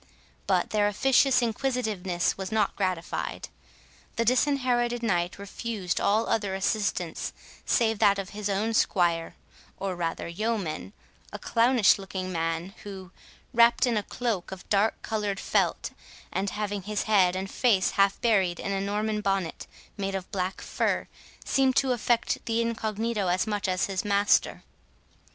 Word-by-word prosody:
But - - +1
their 210 -1 +3
officious 260 +4 +3
inquisitiveness 220 -7 -1
was 190 +1 -6
not 215 -2 +1
gratified. 185 -4 -3 0.7
The 230 - 0
Disinherited 245 -2 +1
Knight 175 -5 0
refused 200 -1 -3
all 215 +3 +2
other 205 -4 0
assistance 190 -4 -1 0.3
save 225 -3 +2
that 200 -2 +5
of 195 -1 -4
his 210 0 -4
own 210 +3 0
squire, 170 -6 +1 0.4
or 195 -2 -3
rather 170 -1 -3
yeoman—a 200 -1 -5
clownish 230 -3 +3
looking 190 -1 -5
man, 165 +2 -2
who, 190 -2 -9 0.4
wrapt 235 +1 +5
in 240 -2 +1
a 210 - +1
cloak 215 -3 -3
of 190 -1 -9
dark 210 +2 +2
coloured 210 -3 -2
felt, - - 0 0.4
and 195 +1 -1
having 205 -1 -3
his 210 +2 -2
head 190 -4 +3
and 190 +1 -4
face 215 -7 +2
half 195 0 +2
buried 190 -7 +2
in 200 - -3
a 195 0 -1
Norman 210 +2 -1
bonnet 195 -4 -2 0.3
made 195 -1 -2
of 190 -1 -5
black 185 0 -2
fur, - - -1 0.4
seemed 265 -1 +2
to 265 -1 +3
affect 240 0 0
the 230 0 +1
incognito 225 -2 -1
as 180 +3 +1
much 210 -3 -2
as 185 -1 +1
his 195 -2 -2
master. 205 0 +2
205 Hz, 145 wpm, -27 LUFS, 190-225 Hz, 0.7 s, that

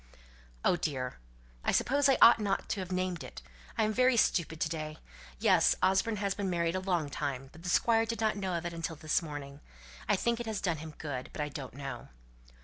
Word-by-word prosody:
"Oh, 175 - +4
dear! 130 -6 -3 0.5
I - - +2
suppose 280 +2 +3
I 270 - +5
ought 230 - +8
not 200 -2 -1
to 205 - -1
have 185 -1 -5
named 185 -2 -1
it. - - -10 0.3
I'm 215 0 +2
very 255 +1 +4
stupid 160 -6 +2
to - - +2
day. 155 -1 -5 0.4
Yes! - - +4
Osborne 195 +4 +3
has 200 -1 -1
been 200 -1 -2
married 170 -1 0
a 185 - 0
long 180 -5 0
time; 135 -2 -4
but 165 - -14
the 180 - -4
Squire 225 +4 +3
did 230 0 -3
not 220 -2 +1
know 190 -3 -2
of 170 0 -3
it 170 - -3
until 165 -1 -4
this 155 +2 0
morning. 145 -3 -7 0.5
I - - +5
think 235 +4 0
it 240 - -5
has 215 -3 -2
done 175 -4 0
him 155 0 -9
good. 135 -5 -5
But - - -4
I 150 - -4
don't 135 -3 -7
know." 140 -1 -6
175 Hz, 220 wpm, -31 LUFS, 155-210 Hz, 0.5 s, ought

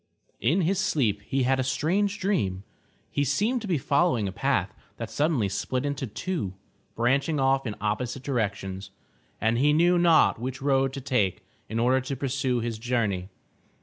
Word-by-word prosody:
In 160 +12 +2
his 185 +3 +1
sleep 120 - +1
he 135 -1 +1
had 130 +1 +2
a - - +2
strange 195 +10 0
dream. 100 - 0 0.5
He 140 - +1
seemed 210 - +1
to 215 - -6
be 175 -4 +1
following 140 - +2
a - - -3
path - - 0 0.2
that - - -6
suddenly 145 -8 +1
split 125 +7 -2
into 140 -2 -2
two, 110 - -3 0.4
branching 140 +6 +1
off 135 -1 +2
in 105 - -3
opposite 120 +5 -2
directions, 100 -7 -2 0.5
and 115 +2 +1
he 145 +2 +4
knew 175 +3 +4
not 165 -8 +4
which 130 +2 -4
road 135 -1 +2
to 135 - -5
take 125 -9 0 0.2
in 110 - -3
order 125 +3 +3
to 130 +2 -4
pursue 130 -2 -1
his 115 -1 -3
journey. 110 -6 -1
130 Hz, 170 wpm, -26 LUFS, 115-150 Hz, 0.5 s, he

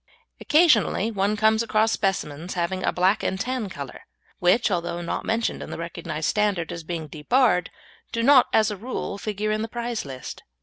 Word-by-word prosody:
Occasionally 295 - +3
one 205 0 0
comes 220 +1 +3
across 220 -1 +2
specimens 175 -4 -2
having 185 +2 -1
a - - +2
black 185 +4 +2
and 190 - -2
tan 250 -2 -2
colour, 140 -7 -8 0.4
which, 195 +6 +3
although 175 -1 -1
not 170 - -4
mentioned 225 +1 -1
in - - -7
the - - -6
recognised 170 -2 -4
standard 205 -6 0
as 170 - -6
being 165 -1 -4
debarred, 180 - +2 0.4
do 230 - -1
not 265 0 +6
as 215 -1 +3
a 205 - -5
rule 210 -2 -5
figure 215 0 -2
in 215 0 0
the 225 - -2
prize 235 0 -3
list. 130 -2 -8
205 Hz, 180 wpm, -24 LUFS, 175-225 Hz, 0.4 s, not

